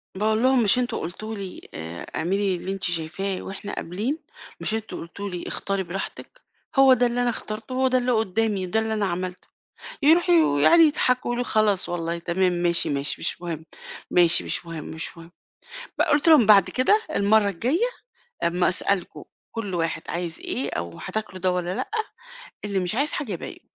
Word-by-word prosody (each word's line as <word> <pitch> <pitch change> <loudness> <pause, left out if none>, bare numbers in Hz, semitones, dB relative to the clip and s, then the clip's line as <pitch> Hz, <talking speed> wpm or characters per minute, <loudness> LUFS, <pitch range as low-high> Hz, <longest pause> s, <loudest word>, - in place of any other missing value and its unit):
باقول 215 +4 +1
لهم: 260 -2 +4
"مش 215 +4 +5
أنتم 245 -1 -1
قُلتوا 215 +6 -6
لي 195 -3 -7
آآ 80 +2 -6
اعملي 190 +3 0
اللي 185 +2 -5
أنتِ 195 -1 -7
شايفاه 175 +3 -1
وإحنا 195 +1 -7
قابلين؟ 210 - -3 0.4
مش - - -2
أنتم 220 0 -4
قُلتوا 200 +4 -7
لي 180 -2 -6
اختاري 195 -1 -2
براحتِك؟ 185 +2 -7 0.4
هو 270 -1 +8
ده 250 -1 +3
اللي 240 +1 0
أنا 245 - +2
اخترته، 220 +1 -5
هو 260 0 +2
ده 255 - +2
اللي 250 0 0
قُدّامي، 220 -3 0
ده 185 +5 0
اللي 220 0 -1
أنا 210 -2 0
عملته." 180 0 -4 0.6
يروحوا 340 +4 +5
ويقعُدوا 325 - +5
يضحكوا 255 -4 +2
يقولوا: 240 +1 -1
"خلاص 215 -5 +2
والله 170 -1 -2
تمام، 180 +2 0
ماشي، 175 -1 +1
ماشي، 140 0 0
مش - - -2
مهم. 165 -3 -5 0.5
ماشي، 175 -1 +5
مش - - -2
مهم، 165 -2 -6
مش 160 +2 -5
مهم." 165 +1 -13 0.7
ب - - +5
قُلت 300 -1 +2
لهم: 300 -9 +7
"بعد 200 -2 +6
كده 330 +12 +3
المرّة 205 +1 +3
الجاية 255 - 0 0.6
أمّا 175 +1 +2
أسألكم 185 0 0 0.3
كل 205 -5 -5
واحد 165 -2 -1
عايز 170 -2 -3
إيه 135 +2 -3
أو 85 0 -5
هتاكلوا 210 -4 -4
ده 185 0 +1
والّا 180 0 -2
لأ، - - -4 0.8
اللي 200 -2 -1
مش 180 +1 -1
عايز 285 +5 +2
حاجة 275 -9 -3
يبي 175 - -7
195 Hz, 180 wpm, -24 LUFS, 175-230 Hz, 0.8 s, هو